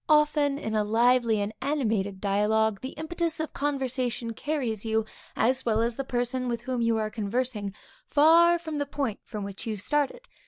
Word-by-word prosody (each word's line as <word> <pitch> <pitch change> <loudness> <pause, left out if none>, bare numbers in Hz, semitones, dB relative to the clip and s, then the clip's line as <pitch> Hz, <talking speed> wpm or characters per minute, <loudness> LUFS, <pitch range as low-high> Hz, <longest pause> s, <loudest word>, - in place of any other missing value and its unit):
Often 300 -2 +3
in 220 -7 -4
a 215 -1 +2
lively 230 +1 +3
and 205 +2 -3
animated 220 -9 0
dialogue, 210 +1 +1
the 260 - -6
impetus 325 +1 -2
of 315 - -3
conversation 260 -4 -1
carries 245 -6 -2
you, 220 -1 0 0.3
as 260 +2 +2
well 220 -2 +1
as 230 0 +1
the 275 - -3
person 250 0 -1
with 235 -1 -2
whom 250 -1 -2
you 230 -1 +2
are 215 -1 -1
conversing, 215 -1 -2 0.4
far 335 +3 +6
from 315 -3 -5
the 285 - -1
point 275 -7 -2
from 210 -3 -6
which 200 +2 -6
you 215 -1 -2
started. 295 - 0
245 Hz, 180 wpm, -27 LUFS, 220-285 Hz, 0.4 s, far